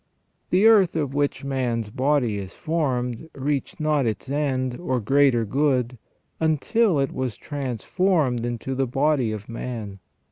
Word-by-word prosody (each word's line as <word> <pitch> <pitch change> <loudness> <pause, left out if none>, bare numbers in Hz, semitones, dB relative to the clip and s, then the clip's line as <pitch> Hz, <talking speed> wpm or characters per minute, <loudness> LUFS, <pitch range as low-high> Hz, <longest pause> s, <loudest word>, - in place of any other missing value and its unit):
The 190 +4 +3
earth 205 -7 +6
of 145 -4 -1
which 145 -1 -1
man's 120 -5 -2
body 130 -5 +1
is 95 -1 -8
formed 135 -4 -2
reached 140 0 -2
not 150 -4 +1
its 110 +4 -3
end, 130 -4 -1
or 130 -7 -1
greater 130 0 +3
good, 125 -1 0 0.4
until 160 - +2
it 135 -1 0
was 130 -4 -3
transformed 140 - 0
into 120 +2 -3
the 135 0 0
body 135 -2 +1
of 105 -1 -6
man. 115 -4 -6
135 Hz, 140 wpm, -24 LUFS, 120-150 Hz, 0.4 s, earth